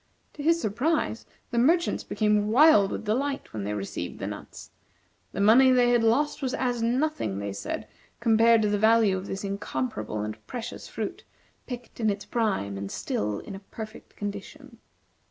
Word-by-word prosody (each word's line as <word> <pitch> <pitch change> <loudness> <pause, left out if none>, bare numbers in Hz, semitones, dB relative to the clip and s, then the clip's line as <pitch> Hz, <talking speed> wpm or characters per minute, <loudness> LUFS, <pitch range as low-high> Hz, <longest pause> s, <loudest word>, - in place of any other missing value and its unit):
To 295 - -8
his 330 +3 +3
surprise 245 +1 -1 0.2
the 235 - +1
merchants 335 +8 +2
became 210 -1 +1
wild 230 -4 +6
with - - -5
delight 270 +6 -1
when 105 -2 -4
they 105 +1 -2
received 100 -1 -5
the - - -5
nuts. - - -8 0.6
The - - -5
money 230 +6 +6
they 250 -1 +4
had 240 -1 +3
lost 280 +8 +2
was 260 -2 -1
as 245 -2 -1
nothing, 250 - 0
they 100 0 -4
said, 100 - -5 0.3
compared 230 -1 +5
to 210 - +2
the 205 0 +1
value 220 -2 +4
of 190 +1 -5
this 195 - -4
incomparable 130 - -3
and 110 +1 -5
precious 240 0 -6
fruit, - - -5 0.4
picked 245 -1 -8
in 220 -2 +2
its 200 0 -3
prime, 190 - -1
and 100 0 -5
still 105 0 -2
in - - -9
a 195 - -7
perfect 215 +2 -10
condition. 225 +6 -7
220 Hz, 175 wpm, -27 LUFS, 195-250 Hz, 0.6 s, wild